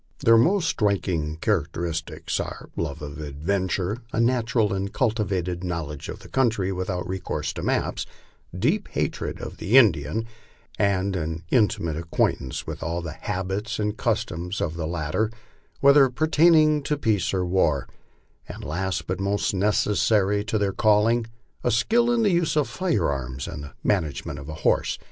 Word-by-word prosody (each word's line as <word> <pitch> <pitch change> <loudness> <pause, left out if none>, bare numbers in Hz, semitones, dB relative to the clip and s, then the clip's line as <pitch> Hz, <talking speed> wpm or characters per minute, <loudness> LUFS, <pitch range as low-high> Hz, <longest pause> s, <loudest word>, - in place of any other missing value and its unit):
Their 115 - +7
most 170 - +4
striking 90 - 0
characteristics 85 -4 -2
are - - -6
love 75 -3 -3
of 70 0 -7
adventure, 90 +7 -1
a - - -1
natural 115 -3 +2
and 95 0 -2
cultivated 100 - -1
knowledge 80 -5 -4
of - - -7
the - - -12
country 115 -7 +1
without 90 -1 -3
recourse 95 0 -3
to - - -5
maps, - - -1 0.5
deep 160 - +1
hatred - - -3
of - - -7
the 115 +7 +3
Indian, 110 - +4 0.5
and 100 -1 +1
an 80 0 -3
inti 110 -5 +3
mate 80 -2 -2
acquaintance 80 -5 -1
with - - -6
all 85 +2 -2
the 85 - -4
habits 95 +6 -3
and 105 -1 -1
customs 90 +4 -2
of 80 - -1
the 80 -2 -3
latter, 85 +6 -1 0.5
whether 140 -1 +7
per 135 +6 0
taining 155 -2 +5
to 150 - 0
peace 110 - +1
or 95 -1 0
war, 85 -6 +1 0.6
and - - -8
last 85 +1 -2
but 95 +2 -3
most 100 +1 0
necessary 105 0 +2
to 110 0 -1
their 100 -2 0
calling, 110 +2 +3 0.4
skill 230 - +3
in 235 -1 +2
the 205 - +3
use 170 -3 +1
of 150 - +2
firearms 65 - -1
and 75 -3 -6
in - - -9
the - - -22
management 80 -7 -1
of 70 +3 -9
a 80 - -5
horse. - - +2
95 Hz, 160 wpm, -25 LUFS, 85-115 Hz, 0.6 s, Their